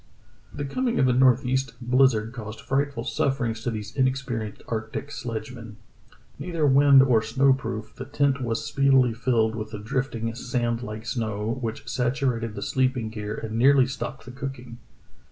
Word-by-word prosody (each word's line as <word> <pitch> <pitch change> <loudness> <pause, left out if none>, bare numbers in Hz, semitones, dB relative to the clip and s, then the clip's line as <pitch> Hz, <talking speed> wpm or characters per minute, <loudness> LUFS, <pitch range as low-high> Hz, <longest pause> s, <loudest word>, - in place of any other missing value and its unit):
The 145 - -5
coming 245 - -1
of 130 - +4
a 125 - +3
northeast 130 0 +2
blizzard 125 -3 +2
caused 110 -3 -7
fright 140 +1 0
ful 115 -4 -5
sufferings 120 -4 -1
to 120 - -2
these 105 -2 -6
inexperienced 130 -5 -1
arctic 110 +5 -4
sledgemen. 115 -3 -6 0.6
Neither 165 -4 -1
wind 140 0 +7
or 120 -5 +3
snow 135 +4 +3
proof, 110 -4 -5
the - - -7
tent 140 -1 +1
was 115 -2 -2
speedily 135 -3 +3
filled 115 -2 +1
with 110 -1 -5
the 110 - -6
drifting, 115 +1 -2
sand 120 -1 -2
like 110 -2 -7
snow, 115 -1 -2
which 115 -2 -4
satu 130 +2 0
rated 115 -2 -5
the 100 - -4
sleeping 130 -4 0
gear 105 -1 -5
and 110 -1 -5
nearly 135 +1 +6
stopped 135 0 -6
the 125 - -8
cooking. 125 -3 -7
125 Hz, 165 wpm, -25 LUFS, 110-135 Hz, 0.6 s, wind